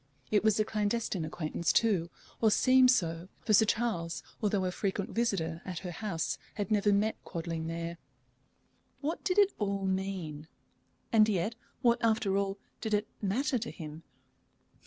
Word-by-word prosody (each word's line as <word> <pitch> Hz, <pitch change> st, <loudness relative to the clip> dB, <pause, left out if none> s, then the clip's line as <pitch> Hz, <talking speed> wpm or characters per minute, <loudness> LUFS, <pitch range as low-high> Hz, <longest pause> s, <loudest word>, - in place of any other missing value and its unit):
It 210 Hz, -1 st, +3 dB
was 220 Hz, -1 st, +3 dB
a 215 Hz, -, +3 dB
clandestine 210 Hz, -4 st, -1 dB
acquaintance 160 Hz, +1 st, -1 dB
too, 195 Hz, -7 st, +2 dB, 0.3 s
or 220 Hz, -, +5 dB
seemed 255 Hz, +3 st, +5 dB
so, 170 Hz, -7 st, +1 dB, 0.2 s
for 215 Hz, -, +3 dB
Sir 220 Hz, +2 st, +7 dB
Charles, 205 Hz, -8 st, -1 dB, 0.2 s
although 205 Hz, -3 st, +1 dB
a 180 Hz, -, 0 dB
frequent 195 Hz, +1 st, -2 dB
visitor 170 Hz, -8 st, -1 dB
at 185 Hz, -2 st, -5 dB
her 180 Hz, -, -3 dB
house, 175 Hz, -3 st, -2 dB, 0.2 s
had 205 Hz, +1 st, -3 dB
never 205 Hz, -1 st, +3 dB
met 210 Hz, +2 st, +1 dB
Quadling 165 Hz, -1 st, -4 dB
there. 170 Hz, 0 st, -4 dB, 1.0 s
What 310 Hz, +4 st, -2 dB
did 365 Hz, 0 st, 0 dB
it 405 Hz, -1 st, +5 dB
all 200 Hz, -2 st, -1 dB
mean? 190 Hz, -6 st, -3 dB, 0.7 s
And 215 Hz, -1 st, +6 dB
yet, 200 Hz, +2 st, 0 dB, 0.3 s
what, 235 Hz, 0 st, +4 dB
after 220 Hz, -3 st, +2 dB
all, 195 Hz, 0 st, 0 dB, 0.2 s
did 220 Hz, -1 st, +1 dB
it 210 Hz, +1 st, -1 dB
matter 250 Hz, +7 st, +1 dB
to 230 Hz, -, -4 dB
him? 155 Hz, -2 st, -8 dB
200 Hz, 155 wpm, -31 LUFS, 170-220 Hz, 1.0 s, Sir